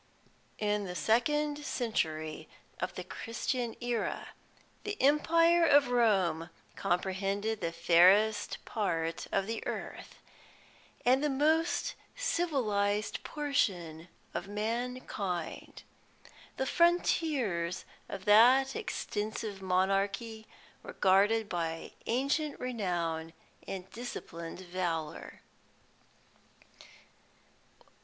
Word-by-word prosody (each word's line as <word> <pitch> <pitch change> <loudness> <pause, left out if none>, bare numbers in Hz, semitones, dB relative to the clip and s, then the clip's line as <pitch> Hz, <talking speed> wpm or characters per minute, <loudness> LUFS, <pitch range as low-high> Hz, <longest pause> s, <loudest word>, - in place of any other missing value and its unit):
"In 210 -1 0
the 180 -1 -6
second 295 +8 +1
century 155 - -2 0.3
of - - -3
the - - -5
Christian 235 0 -3
AEra, 240 -1 -2 0.5
the 420 0 -4
empire 330 +4 +4
of 285 -4 +5
Rome 190 -9 +2 0.3
comprehended 195 +3 -1
the 165 - -1
fairest 185 +6 +4
part 165 -7 -2
of 195 - +1
the 225 +2 -3
earth, - - -6 0.9
and 260 +3 +4
the 300 - +2
most 315 +5 +1 0.2
civilised 220 - 0
portion 180 - -1 0.3
of 195 - -4
mankind. 210 -4 -4 0.7
The 265 - 0
frontiers 280 - +1 0.2
of 195 0 -6
that 250 - +6
extensive 215 - -4
monarchy 195 +4 0 0.3
were - - -9
guarded 205 +4 +3
by 165 -3 -3 0.2
ancient 280 +5 0
renown 175 -9 -2 0.3
and 190 -1 -5
disciplined 175 -8 -7
valour." 175 -4 -4
210 Hz, 85 wpm, -31 LUFS, 185-260 Hz, 0.9 s, that